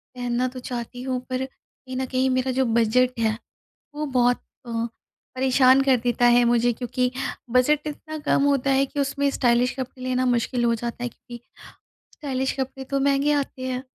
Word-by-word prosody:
पहनना 245 0 -1
तो 255 0 -7
चाहती 245 0 -6
हूँ 255 -1 -1
पर 255 +1 -1
कहीं 260 0 -13
न 260 - -1
कहीं 260 +1 0
मेरा 255 0 +1
जो 265 - +3
बजट 235 +2 +2
है 220 -1 +1 0.6
वो 300 +1 -2
बहुत 245 -3 +2 0.3
अ, - - -6 0.6
परेशान 260 0 +5
कर 265 -2 +4
देता 245 0 +2
है 240 0 +6
मुझे 240 0 +3
क्योंकि 250 +1 -1 0.4
बजट 290 +5 +3
इतना 310 +1 -6
कम 275 - +3
होता 275 -1 +2
है 270 +1 +3
कि 285 - -6
उसमें 280 0 +1
स्टाइलिश 245 -1 +2
कपड़े 255 0 -6
लेना 255 0 0
मुश्क़िल 245 0 0
हो 235 - +3
जाता 235 +1 -5
है 245 - -2
क्योंकि 240 0 -12 0.7
स्टाइलिश 265 -3 -2
कपड़े 265 0 -4
तो 275 +1 -1
महँगे 280 +1 +2
आते 280 -2 -2
हैं। 255 0 -3
255 Hz, 180 wpm, -24 LUFS, 245-270 Hz, 0.7 s, है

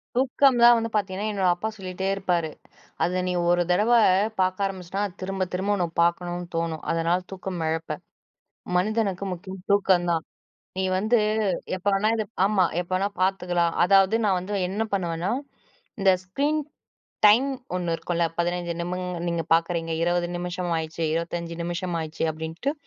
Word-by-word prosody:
தூக்கம் 260 0 +3
தான் 240 0 +9
வந்து 230 0 -1
பார்த்தீங்கன்னா, 205 0 -1
என்னோட 195 -2 +1
அப்பா 195 +5 -3
சொல்லிட்டே 190 0 -4
இருப்பாரு. 180 -5 0 0.5
அத 180 +2 +1
நீ 180 - 0 0.2
ஒரு 175 0 +4
தடவ 210 +6 +3 0.5
பார்க்க 185 +2 +1
ஆரம்பிச்சிட்டா 190 0 -5 0.2
திரும்ப, 190 0 -2
திரும்ப 200 +3 0
உன்ன 180 -3 0
பார்க்கணுன்னு 175 +1 0
தோணும். 165 -1 -2
அதனால 165 +1 +2
தூக்கம் 185 -2 -5
இழப்ப! 160 -1 -2 0.8
மனிதனுக்கு 200 -1 0
முக்கியம் 185 +1 -9
தூக்கம் 190 -3 +3
தான். 165 -2 -1 0.5
நீ 190 - 0
வந்து 220 +5 +3 0.6
எப்போ 185 +2 -1
வேணா 200 +2 +2
இது 220 - 0 0.2
ஆமா. 195 -3 +3 0.2
எப்ப 175 - -11
வேணா 195 +2 +1
பார்த்துக்கலாம். 180 -2 +1
அதாவது 195 +3 +5
நான் 195 -3 +3
வந்து 185 +3 -6 0.2
என்ன 205 +4 -1
பண்ணுவேன்னா, 175 -1 -1 0.7
இந்த 195 -1 +5
ஸ்க்ரீன் 285 +11 0 0.7
டைம் 225 +6 +6 0.3
ஒண்ணூ 175 -2 -1
இருக்கும்ல. 170 0 -1
15 175 0 -1
நிமி 175 +1 -2 0.3
நீங்க 170 -1 -1
பார்க்குறீங்க, 165 0 0
20 175 0 +1
நிமிஷம் 180 0 -3
ஆயிடுச்சே! 160 +1 -3
25 170 0 -3
நிமிஷம் 175 +1 -3
ஆயிடுச்சு 160 0 -4
அப்பிடின்ட்டு. 160 - -3
180 Hz, 145 wpm, -25 LUFS, 170-195 Hz, 0.8 s, தான்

